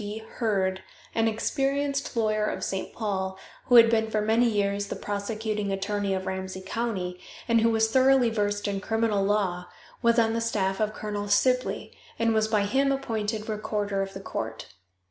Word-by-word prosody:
D. 205 +1 -5
Heard, 200 -4 -1 0.3
an 225 0 +2
experienced 275 +4 -1
lawyer 215 -1 +1
of - - -3
St. 190 -1 -3
Paul, 190 -3 -3 0.3
who 245 - +4
had 230 -1 +10
been 220 -1 +1
for 215 - 0
many 220 +3 +3
years 200 -1 0
the - - -4
prosecuting 210 0 -3
attorney 195 0 -1
of 190 0 -4
Ramsey 190 0 -4
county, 190 -5 -3 0.3
and 230 -1 +4
who 230 - +4
was 225 0 +2
thoroughly 260 -1 +4
versed 205 -1 -1
in 200 -1 -2
criminal 220 -2 +1
law, 195 -3 0 0.3
was 235 0 +3
on 225 -1 +3
the 230 - -1
staff 195 -4 0
of 215 0 0
Colonel 205 -1 -4
Sibley, 250 +5 +1 0.2
and 230 0 +2
was 220 0 +2
by 215 -2 +2
him 275 +6 +2
appointed 220 -5 -2
recorder 210 -2 -2
of 195 0 -4
the 195 - -6
court. 110 - -5
215 Hz, 175 wpm, -27 LUFS, 200-230 Hz, 0.3 s, had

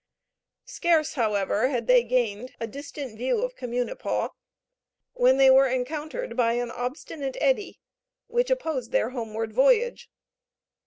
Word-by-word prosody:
Scarce, 325 -3 +1
however, 210 -2 +1
had 240 -4 -2
they 250 0 +5
gained 240 -1 -1
a 230 - -2
distant 280 0 -8
view 260 - 0
of - - -3
Communipaw, 245 - -2 0.8
when 255 +2 +4
they 270 -1 +7
were 270 +1 +6
encountered 300 - -3
by 235 -2 +2
an 240 0 -2
obstinate 265 +2 -5
eddy, 280 +8 0 0.5
which 485 +1 0
opposed 315 - -2
their 225 - +1
homeward 225 -3 -4
voyage. 470 - +2
255 Hz, 125 wpm, -26 LUFS, 235-305 Hz, 0.8 s, they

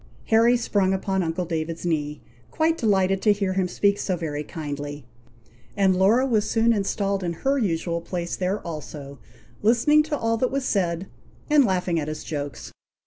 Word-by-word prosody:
Harry 230 +2 +5
sprung 200 -5 +1
upon 190 0 -1
uncle 170 +1 -2
David's 165 0 -3
knee, 150 -3 -2 0.3
quite 320 +1 +1
delighted 195 - +1
to 215 - +4
hear 200 -2 0
him 185 -1 +1
speak 200 +2 +1
so 185 - -1
very 150 -3 -3
kindly, 145 -2 -6 0.7
and 190 -2 +3
Laura 210 +8 +4
was 220 -5 +1
soon 230 0 +3
installed 200 -1 -1
in 170 -1 -1
her 275 +1 +3
usual 170 -5 -1
place 175 0 -4
there 190 +3 -1
also, 145 -4 -7 0.4
listening 240 +8 +4
to 300 -1 -2
all 230 -2 0
that 255 +2 +1
was 275 -1 -2
said, 180 -4 0 0.5
and 295 -3 +6
laughing 180 -4 0
at 150 - -3
his 155 0 -5
jokes. 145 -4 -5
190 Hz, 170 wpm, -24 LUFS, 165-220 Hz, 0.7 s, and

